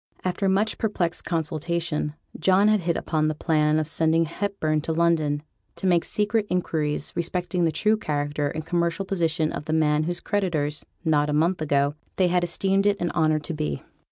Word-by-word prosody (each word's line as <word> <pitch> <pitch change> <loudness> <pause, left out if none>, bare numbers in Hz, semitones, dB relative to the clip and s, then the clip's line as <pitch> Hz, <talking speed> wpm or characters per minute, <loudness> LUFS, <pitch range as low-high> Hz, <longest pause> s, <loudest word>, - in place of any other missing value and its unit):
After 190 +2 0
much 205 +3 +1
perplexed 180 -6 -1
consultation, 160 -1 -2 0.2
John 190 +2 +4
had 215 -1 +4
hit 170 -2 -1
upon 155 -1 0
the 155 - -1
plan 155 -1 +2
of 155 -1 0
sending 165 +1 +2
Hepburn 165 -3 -1
to 160 - -3
London 160 -3 +1 0.3
to - - -6
make 175 -2 +3
secret 210 0 0
inquiries 155 -5 -1
respecting 175 +1 -1
the 165 - +2
true 215 +8 +2
character 145 -4 -1
and 155 +2 -4
commercial 170 +2 0
position 165 -4 0
of 145 - -5
the 155 - -2
man 155 -1 +2
whose 175 +1 -2
creditors, 160 -8 -1 0.2
not 150 -2 +2
a - - 0
month 165 +4 +1
ago, 145 -1 +1 0.2
they 185 -2 +3
had 175 0 +2
esteemed 195 +3 +1
it 200 0 +2
an 175 - -1
honour 155 -2 +2
to 155 +3 -5
be. 75 - -3
165 Hz, 185 wpm, -25 LUFS, 155-180 Hz, 0.3 s, John